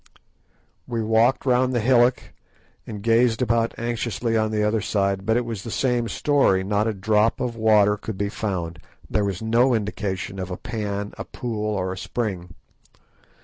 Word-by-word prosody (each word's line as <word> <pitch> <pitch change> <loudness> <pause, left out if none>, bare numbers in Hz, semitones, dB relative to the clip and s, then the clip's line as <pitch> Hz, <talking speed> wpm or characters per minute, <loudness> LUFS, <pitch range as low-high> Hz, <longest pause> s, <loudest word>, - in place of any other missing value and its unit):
We 115 -2 -2
walked 115 +5 +2
round 130 0 +2
the 120 - +1
hillock 120 +1 +2 0.5
and 105 -2 -7
gazed 115 0 +3
about 115 -2 +1
anxiously 115 0 -2
on 110 -1 +2
the 105 -1 0
other 105 +1 +1
side, 100 -1 -1
but 110 +1 +3
it 120 - -1
was 115 -4 -5
the 115 - -7
same 120 0 0
story, 135 -10 +2
not 105 +2 0
a 110 - 0
drop 105 +3 +2
of 120 -2 -2
water 105 -2 +4
could 105 0 -6
be 100 0 -1
found; 90 -7 -4 0.3
there 105 - 0
was 100 +1 -3
no 120 +3 +3
indication 100 -2 -3
of 95 -1 -4
a 90 - -4
pan, 105 -2 -4
a - - -3
pool, 105 -3 -3
or 95 -1 -2
a - - -9
spring. 95 -9 -4
110 Hz, 175 wpm, -23 LUFS, 100-115 Hz, 0.5 s, water